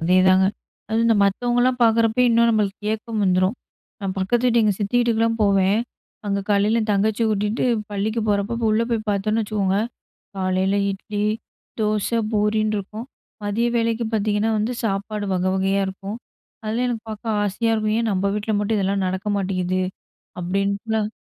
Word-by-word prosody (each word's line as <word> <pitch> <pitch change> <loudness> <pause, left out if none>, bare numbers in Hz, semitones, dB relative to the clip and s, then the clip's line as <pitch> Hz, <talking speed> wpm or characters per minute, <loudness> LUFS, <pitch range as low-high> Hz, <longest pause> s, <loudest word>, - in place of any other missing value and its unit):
அதேதாங்க. 185 +2 +4 0.4
அதுவும் 225 +1 +1
இந்த 225 -2 +4
மத்தவங்கள்லாம் 245 +4 +1
பாக்கறப்ப, 225 +1 +3
இன்னும் 235 0 +4
நம்மளுக்கு 210 -2 -1
ஏக்கம் 220 -1 -3
வந்துரும். 185 +4 +2 0.4
நான் 195 -1 -3
பக்கத்து 230 +6 +1
வீட்டுக்கு, 235 -2 +3
எங்க 205 - +2
சித்தி 205 +4 0
வீட்டுக்குலாம் 230 -1 +1
போவேன். 195 +1 +3 0.5
அங்க 200 0 0
காலைல 210 +3 +3
என் 215 -1 -1
தங்கச்சிய 215 +3 +1
கூட்டிட்டு 210 +3 0 0.3
பள்ளிக்கு 215 +3 -1
போறப்போ, 205 +2 0
அப்ப 230 -1 -1
உள்ள 220 - +2
போய் 220 -2 -1
பாத்தோம்ன்னு 215 +3 0
வச்சுக்கோங்க, 200 -2 0 0.6
காலைல 190 +1 +1 0.2
இட்லி, 205 +1 -3 0.5
தோசை, 215 +2 0
பூரின்ருக்கும். 215 +1 -1 0.4
மதிய 215 +4 0
வேளைக்கு 230 0 0
பாத்தீங்கன்னா, 215 +1 +1
வந்து 220 +4 -1
சாப்பாடு 205 0 -2
வகை 185 +1 +1
வகையா 195 +1 +1
இருக்கும். 195 +3 -6 0.5
அதெல்லாம் 225 +3 -1
எனக்கு 230 -2 -3
பாக்க 215 +1 -8 0.2
ஆசையா 225 +3 0
இருக்கும். 215 -1 0
"ஏன் 230 -1 0
நம்ப 190 +1 0
வீட்ல 210 +1 -2
மட்டும் 210 +2 0
இதெல்லாம் 195 0 0
நடக்க 190 +3 -3
மாட்டேங்குது?" 185 -1 -1 0.6
அப்பிடீன்ட்லாம். 200 +4 -1
210 Hz, 150 wpm, -22 LUFS, 195-225 Hz, 0.6 s, அதேதாங்க